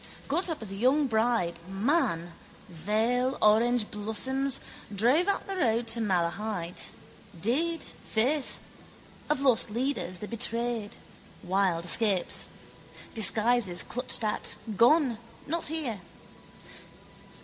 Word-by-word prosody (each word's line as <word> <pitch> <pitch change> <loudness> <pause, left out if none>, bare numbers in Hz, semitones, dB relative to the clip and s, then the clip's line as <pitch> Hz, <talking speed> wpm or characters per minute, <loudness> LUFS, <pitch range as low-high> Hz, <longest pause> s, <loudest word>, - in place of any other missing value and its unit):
Got 350 +6 0
up 320 -8 -4
as 200 - -5
a - - -5
young 265 +7 +3
bride, 220 -8 +1
man, 195 - 0 0.4
veil, 220 +9 0
orangeblossoms, 235 +4 +1 0.4
drove 255 - +3
out 400 - 0
the 390 - -4
road 235 -8 +1
to 230 +1 +2
Malahide. 180 -1 -1 0.5
Did, 310 - 0
faith. 260 +6 -1 0.7
Of 300 -2 +1
lost 250 -5 +3
leaders, 235 -5 -2
the 210 - -7
betrayed, 230 -1 -1 0.5
wild 185 -2 +1
escapes. 195 0 +2 0.7
Disguises, 220 -3 +3
clutched 250 -1 -2
at, 210 - -1 0.2
gone, 245 - +4 0.3
not 330 +3 -2
here. 290 - -3
230 Hz, 105 wpm, -28 LUFS, 205-265 Hz, 0.7 s, gone